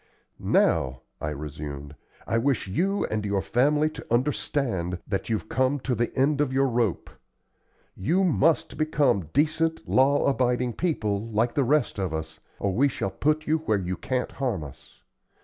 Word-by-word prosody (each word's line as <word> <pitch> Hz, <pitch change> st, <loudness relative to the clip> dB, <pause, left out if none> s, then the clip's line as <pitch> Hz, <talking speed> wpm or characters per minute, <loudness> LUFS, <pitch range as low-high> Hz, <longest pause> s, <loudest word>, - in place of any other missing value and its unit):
"Now," 65 Hz, 0 st, +2 dB, 0.2 s
I 75 Hz, -, -2 dB
resumed, 75 Hz, -1 st, -6 dB, 0.3 s
"I 115 Hz, -, +1 dB
wish 130 Hz, -3 st, 0 dB
you 195 Hz, -, 0 dB
and 110 Hz, -1 st, -1 dB
your 100 Hz, -1 st, 0 dB
family 150 Hz, +9 st, +2 dB
to -, -, -10 dB
understand 120 Hz, -7 st, 0 dB
that 100 Hz, +1 st, -3 dB
you've 110 Hz, -1 st, -1 dB
come 130 Hz, +4 st, +1 dB
to 130 Hz, -, -1 dB
the 120 Hz, 0 st, 0 dB
end 140 Hz, +2 st, +3 dB
of 145 Hz, -3 st, 0 dB
your 135 Hz, +1 st, +2 dB
rope. 120 Hz, -7 st, 0 dB, 0.8 s
You 175 Hz, -, +1 dB
must 160 Hz, -3 st, +2 dB
become 145 Hz, -, +1 dB
decent, 160 Hz, +2 st, +1 dB
law 140 Hz, +2 st, +3 dB
abiding 125 Hz, -2 st, +1 dB
people, 110 Hz, -, -1 dB
like 115 Hz, +2 st, 0 dB
the 140 Hz, -, +2 dB
rest 135 Hz, -4 st, +1 dB
of 90 Hz, -5 st, -1 dB
us, 80 Hz, 0 st, -6 dB, 0.2 s
or 100 Hz, -1 st, -1 dB
we 135 Hz, +8 st, +4 dB
shall 95 Hz, -7 st, -3 dB
put 155 Hz, +1 st, 0 dB
you 160 Hz, +1 st, +1 dB
where 110 Hz, -9 st, 0 dB
you 90 Hz, -1 st, -3 dB
can't 125 Hz, +4 st, -2 dB
harm 120 Hz, -, -2 dB
us. 65 Hz, -3 st, -13 dB
120 Hz, 165 wpm, -26 LUFS, 95-145 Hz, 0.8 s, we